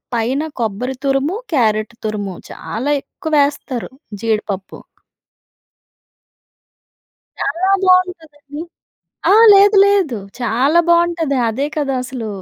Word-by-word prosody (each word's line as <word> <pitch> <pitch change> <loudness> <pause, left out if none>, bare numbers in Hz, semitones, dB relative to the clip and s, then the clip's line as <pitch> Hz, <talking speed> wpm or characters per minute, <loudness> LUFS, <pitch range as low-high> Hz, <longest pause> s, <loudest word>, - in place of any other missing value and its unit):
పైన 245 +5 0 0.2
కొబ్బరి 235 +5 -3
తురుము 275 +8 0 0.2
క్యారట్ 215 -2 0
తురుము 205 -3 -3 0.2
చాలా 280 +6 -3
ఎక్కువ 315 -4 -8
వేస్తారు, 280 -4 -3 0.3
జీడిపప్పు. 210 -4 -3 2.6
చాలా 375 +3 0
బాగుంటుందండి. 320 -6 0 0.7
అహా! 435 +3 +6
లేదు 400 +1 +6
లేదు. 390 - +2 0.2
చాలా 265 +8 +2
బాగుంటది. 340 -4 +2
అదే 265 +6 -2
కదా! 280 -3 -1
అసలు. 250 -4 -6
280 Hz, 90 wpm, -17 LUFS, 230-340 Hz, 2.6 s, అహా